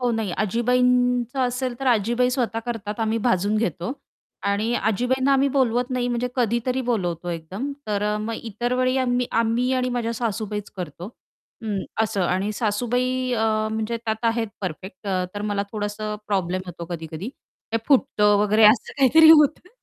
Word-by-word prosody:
हो, 245 -1 +1
नाही 220 -4 -1
आजीबाईंचं 250 +2 +2
असेल 250 0 -1
तर 270 - -3
आजीबाई 240 +2 +2
स्वतः 240 -3 -1
करतात 215 -2 -4
आम्ही 225 0 0
भाजून 205 -1 +2
घेतो 180 - -2 0.6
आणि 215 +4 0
आजीबाईंना 250 +6 +1
आम्ही 275 +1 +3
बोलवत 250 -2 +1
नाही 250 -1 -1
म्हणजे 245 +1 -1
कधीतरी 245 +2 0
बोलवतो 175 -6 -1
एकदम. 185 - -5
तर 205 -1 -1
अ, 210 0 0
मग 225 +2 -3 0.2
इतर 240 +4 -2
वेळी 255 +1 +1
आम्ही 250 -1 +1
अ, 230 - +3
मी 235 +3 0
आणि 255 -1 0
माझ्या 240 -2 -2
सासूबाईच 215 -3 -3
करतो, 175 -1 -6 0.6
उम्म, 205 -3 -2 0.2
असं 205 -3 -1
आणि 190 +4 0
सासूबाई 250 +4 -1
अ, 225 -2 +1 0.3
म्हणजे 220 +1 -2
त्यात 220 +1 -2
आहेत 225 -1 -2
परफेक्ट 185 +2 -7
अ, 185 -2 0
तर 205 - -4
मला 200 0 0
थोडंसं 210 0 -3
प्रॉब्लेम 185 -2 -1
होतो 170 -1 -7
कधी-कधी 165 +3 -5 0.4
ते 230 - +3
फुटतं 210 -7 +4
वगैरे 210 +1 +4
असं 215 +3 +5
काहीतरी 315 +4 +7
होतं 305 +3 +5
225 Hz, 165 wpm, -23 LUFS, 205-250 Hz, 0.6 s, काहीतरी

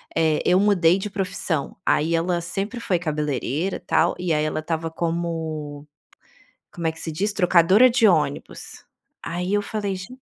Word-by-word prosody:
eh, 160 -2 +2
eu 180 +1 +4
mudei 190 -4 +4
de 205 +2 -4
profissão. 185 -6 -3
Aí 165 +3 +2
ela 170 +1 0
sempre 195 +7 -4
foi 185 -6 0
cabeleireira 150 +1 -2
tal 170 +2 +2
e 180 -2 -1
aí 150 0 +1
ela 155 0 -1
estava 165 0 -3
como 160 -3 -4 0.9
como 170 -2 -4
é 160 - +1
que - - -13
se 165 - -4
diz? 200 +6 -1
Trocadora 185 +5 +5
de 235 -2 +4
ônibus. 150 - -2 0.4
Aí 180 +4 -3
eu 205 - +2
falei, 205 -2 -3
gen 220 +8 -10
170 Hz, 165 wpm, -23 LUFS, 160-195 Hz, 0.9 s, Trocadora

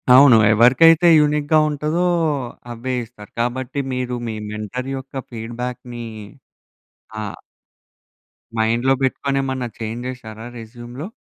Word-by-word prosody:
అవును 130 -3 +8 0.2
ఎవరికైతే 155 +9 +6
యూనిక్‌గా 150 +1 +3
ఉంటాదో 150 +4 -1 0.7
అవే 120 +2 -4
ఇస్తారు. 110 -3 -14
కాబట్టి 130 +3 -2
మీరు 125 -1 -2
మీ 110 - -3 0.2
మెంటర్ 110 +5 -5
యొక్క 135 +1 -10 0.2
ఫీడ్‌బ్యాక్‌ని 120 +1 -6 1.2
ఆ - - -3 1.3
మైండ్‌లో 115 +4 +2
పెట్టుకొనేమన్నా 135 -1 -1
చేంజ్ 115 +2 -4
చేసారా 110 -3 -8
రెజ్యూమ్‌లో. 120 +6 -8
125 Hz, 95 wpm, -20 LUFS, 115-135 Hz, 1.3 s, అవును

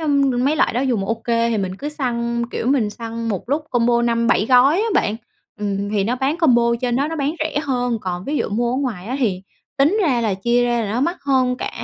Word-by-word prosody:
ừm, 275 -5 +1
mấy 295 +3 +2
loại - - +2
đó 245 - 0
dùng 240 -7 0
OK 225 0 -3
thì 230 -1 +1
mình 190 -1 -3
cứ 285 +8 -5
săn, 235 -5 -2
kiểu, 235 - -3
mình 250 -6 +2
săn 230 +1 -5
một 205 +2 -4
lúc 300 +3 0
combo 235 -1 +2
5-7 235 -2 +2
gói 260 +5 +5
á 430 +4 +1
bạn, 215 - +1 0.4
ừm, 200 0 -2
thì 200 -2 +1
nó 245 +4 -1
bán 275 +5 0
combo 255 -8 +4 0.2
trên 245 -1 0
đó 280 +3 0
nó 325 - -4
bán 290 +2 -1
rẻ 315 -1 -1
hơn, 245 -4 -1
còn 180 -1 -4
ví 295 +1 -2
dụ - - -1
mua 235 +3 0
ở - - -1
ngoài 230 -9 -3
á 255 +3 -3
thì 195 -7 0 0.4
tính 315 +11 +3
ra 265 -9 +2
là 215 -4 0
chia 235 +5 +1
ra 240 -1 +1
là 205 - -3
nó 240 - 0
mắc 340 +7 0
hơn 260 -2 +1
cả - - -4
245 Hz, 250 wpm, -20 LUFS, 225-275 Hz, 0.4 s, gói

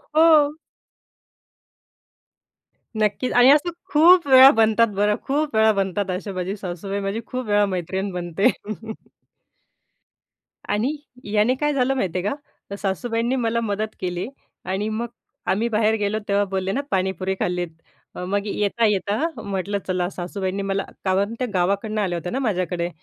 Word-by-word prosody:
हो. 310 -2 +5 2.4
नक्कीच. 215 +4 0
आणि 245 +1 +6
असं 300 +4 +4 0.2
खूप 335 +2 +6
वेळा 265 0 +9
बनतात 225 +1 +4
बरं 205 +1 +2
खूप 290 -1 0
वेळा 220 0 +5
बनतात. 195 +1 -2
अशी 185 +3 -4
माझी 185 +1 -3
सासूबाई 195 +1 -5
माझी 200 +3 -3
खूप 255 -1 -4
वेळा 205 0 +3
मैत्रीण 190 +3 -3
बनते. 175 +1 0 2.2
आणि 225 +9 0 0.4
याने 215 +4 +3
काय 295 +2 0
झालं 265 -1 +1
माहिती 185 -9 -1
आहे 185 - -2
का? - - -3 0.3
तर 200 - -5
सासूबाईंनी 230 +5 -1
मला 235 -2 0
मदत 215 0 -3
केली 180 +1 -3 0.4
आणि 190 +4 -2
मग 225 +2 -3 0.4
आम्ही 220 +5 +1
बाहेर 220 0 +2
गेलो 210 0 -1
तेव्हा 200 0 +2
बोलले 190 0 -2
ना? 275 - -1
पाणीपुरी 190 0 -1
खाल्लीत. 180 0 -1 0.5
अ, - - -5
मग 200 +2 -1
येता-येता 210 - 0
म्हटलं 200 0 -2
चला 180 -1 0
सासूबाईंनी 190 +1 -4
मला 195 0 -1 0.2
कारण 195 +3 +1
ते 255 - 0
गावाकडनं 200 +4 0
आल्या 180 -4 -1
होत्या 180 +1 -5
ना 260 - -1
माझ्याकडे. 180 -7 -1
205 Hz, 145 wpm, -22 LUFS, 190-235 Hz, 2.4 s, वेळा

